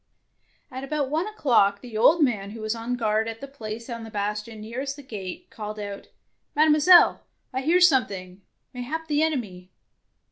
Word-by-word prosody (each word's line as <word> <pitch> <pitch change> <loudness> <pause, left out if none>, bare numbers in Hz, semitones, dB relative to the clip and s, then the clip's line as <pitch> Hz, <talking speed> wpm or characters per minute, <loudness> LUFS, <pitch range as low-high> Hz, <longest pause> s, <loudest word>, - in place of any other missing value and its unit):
At 260 +1 -6
about 280 -1 -2
one 325 +6 0
o'clock 230 - +2
the 240 -3 -10
old 300 +9 +5
man 210 -7 0
who 220 +2 -9
was 215 0 -1
on 230 +2 -3
guard 220 -2 0
at 225 0 -6
the 275 - -7
place 230 -4 -7
on 230 -2 -6
the 225 - -8
bastion 210 +1 -4
near 230 +4 -5
est 280 0 -4
the 285 - -12
gate, 190 -6 -7
called 215 -1 -6
out, 205 -1 -7 0.2
— - - -48
" - - -49
Mademoiselle, 310 +4 +6 0.3
I 260 - -1
hear 330 +6 +3
something, 200 - +2 0.3
mayhap 275 +6 -4
the 295 -1 +1
enemy." 215 -13 -2
235 Hz, 185 wpm, -25 LUFS, 210-285 Hz, 0.3 s, Mademoiselle